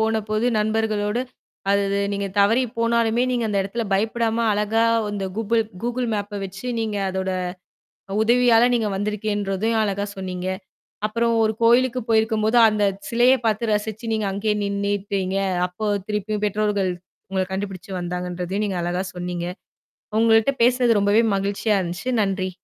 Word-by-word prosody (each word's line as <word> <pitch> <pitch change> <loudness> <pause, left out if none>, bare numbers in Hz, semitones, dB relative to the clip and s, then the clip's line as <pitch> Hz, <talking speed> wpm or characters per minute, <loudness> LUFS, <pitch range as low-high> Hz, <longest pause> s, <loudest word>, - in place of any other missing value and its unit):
போனபோது 220 +1 0
நண்பர்களோடு 215 +1 0 0.5
அதது 200 0 +1
நீங்க 200 0 -2
தவறி 225 +6 +4 0.2
போனாலுமே 230 0 +2
நீங்க 240 -2 0
அந்த 200 -1 0
இடத்துல 230 +4 -3
பயப்படாம 225 +3 +1
அழகா 210 +2 +1 0.3
அந்த 200 -2 -3
கூபுள் 225 +1 +1 0.2
Google 245 +1 -1
Mapப 205 0 -3
வச்சு 195 +6 -8
நீங்க 215 -2 -2
அதோட 190 0 -2 0.9
உதவியால 240 0 +5
நீங்க 225 -3 +1
வந்திருக்கேன்றதையும் 210 +1 -1
அழகா 200 -1 -1
சொன்னீங்க. 185 -1 -5 0.6
அப்புறம் 230 +2 0
ஒரு 220 - +2
கோயிலுக்கு 250 +2 +4
போயிருக்கும்போது 220 +1 +3
அந்த 210 -1 +1 0.2
சிலையை 245 +3 +4
பார்த்து 220 +1 0
ரசிச்சு 220 +2 -2
நீங்க 215 -2 0
அங்கேயே 210 +2 0
நின்னுட்டீங்க. 200 -1 -1 0.3
அப்போ 180 +4 -5 0.2
திருப்பியும் 210 0 -2
பெற்றோர்கள், 205 -2 0 0.4
உங்கள 190 -1 0
கண்டுபிடிச்சு 195 -1 -5
வந்தாங்கன்றதையும் 180 +2 -3
நீங்க 190 -3 -2
அழகா 175 +2 -1
சொன்னீங்க. 175 -1 -4 0.7
உங்கள்ட்ட 225 +3 +4
பேசுனது 245 -2 +4
ரொம்பவே 205 +3 +4
மகிழ்ச்சியா 200 +2 0
இருந்துச்சு. 180 +8 -3
நன்றி! 190 -1 -1
210 Hz, 130 wpm, -22 LUFS, 195-225 Hz, 0.9 s, உதவியால